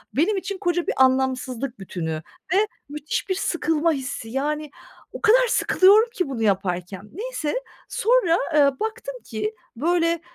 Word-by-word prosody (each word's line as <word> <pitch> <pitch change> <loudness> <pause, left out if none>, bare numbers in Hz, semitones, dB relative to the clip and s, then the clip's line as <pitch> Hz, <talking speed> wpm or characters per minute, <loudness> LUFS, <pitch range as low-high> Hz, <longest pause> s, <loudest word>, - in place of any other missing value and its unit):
benim 385 +8 +2
için 395 +1 -4
koca 350 -3 -1
bir - - +1
anlamsızlık 260 -1 0
bütünü 160 -4 -4 0.3
ve 415 +2 +3 0.2
müthiş 300 +6 -3
bir 375 - +1
sıkılma 330 -3 +1
hissi, 255 -6 -4
yani, 295 +4 -2 0.4
o - - -7
kadar - - +5
sıkılıyorum 425 +4 +5
ki 365 -10 -1
bunu 250 -4 -4
yaparken. 190 0 -1
Neyse, 420 -5 -3 0.3
sonra, 440 -7 +3 0.2
eee, 280 -3 +4
baktım 475 +3 -4
ki, 215 -1 -3 0.2
böyle, 335 +4 +1
300 Hz, 140 wpm, -23 LUFS, 250-380 Hz, 0.4 s, kadar